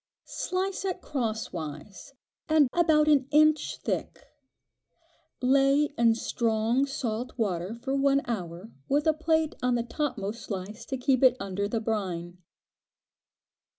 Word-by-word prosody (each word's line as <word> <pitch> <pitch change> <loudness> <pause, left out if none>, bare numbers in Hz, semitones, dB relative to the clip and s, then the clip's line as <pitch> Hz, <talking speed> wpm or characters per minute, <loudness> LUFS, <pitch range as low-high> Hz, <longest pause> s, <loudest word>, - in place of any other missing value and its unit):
Slice 380 +1 -3
it 375 -1 -2
crosswise, 215 - -5 0.3
and 310 -3 +5
about 315 -3 +4
an 280 -4 +4
inch 310 +1 +3
thick; - - -3 1.2
lay 275 +3 +3
in 230 -1 +4
strong 230 +3 0
salt 250 -4 -4
water 190 -2 -2
for 265 +3 -3
one 275 0 +2
hour 185 -2 -5 0.2
with 290 +1 +2
a 315 - +4
plate 315 0 +1
on 250 -1 +2
the 235 - 0
topmost 235 -5 -3
slice 200 +2 -6
to 265 - -3
keep 255 0 +1
it 255 -1 +5
under 195 +1 -2
the 225 +2 -1
brine. 180 -6 -3
250 Hz, 125 wpm, -28 LUFS, 215-290 Hz, 1.2 s, and